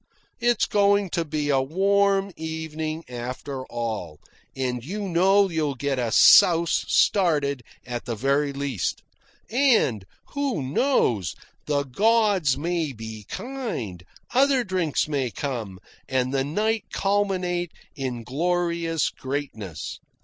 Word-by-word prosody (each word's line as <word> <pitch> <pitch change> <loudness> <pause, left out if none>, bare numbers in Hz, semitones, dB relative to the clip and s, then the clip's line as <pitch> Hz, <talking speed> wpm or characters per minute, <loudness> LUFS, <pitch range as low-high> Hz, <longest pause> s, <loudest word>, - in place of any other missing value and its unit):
It's 240 0 +2
going 200 -2 +2
to 170 - 0
be 150 -2 -2
a 135 -2 +3
warm 195 +5 +2
evening 160 0 -4
after 125 +2 -6
all, 110 -10 -4 0.4
and 125 -2 -2
you 200 +7 -4
know 190 +3 +4
you'll 155 -5 -1
get 135 +1 -1
a 120 -2 -1
souse 170 - +6
started 150 -9 +2 0.2
at 120 -1 -5
the 120 -2 -3
very 140 +5 +1
least. 140 -7 -3 0.5
And 230 - +3 0.3
who 275 - -2
knows? 130 - +1 0.3
the 145 -1 +1
gods 200 - +2
may 165 -1 -1
be 110 -2 -9
kind, 200 - -5 0.3
other 265 0 +4
drinks 185 -9 0
may 140 -4 -1
come, 115 -8 -5 0.3
and 130 0 0
the 135 -1 +1
night 210 +8 -1
culminate 185 -4 0 0.2
in 125 -4 -4
glorious 170 +3 0
greatness. 130 - -5
155 Hz, 120 wpm, -24 LUFS, 130-195 Hz, 0.5 s, souse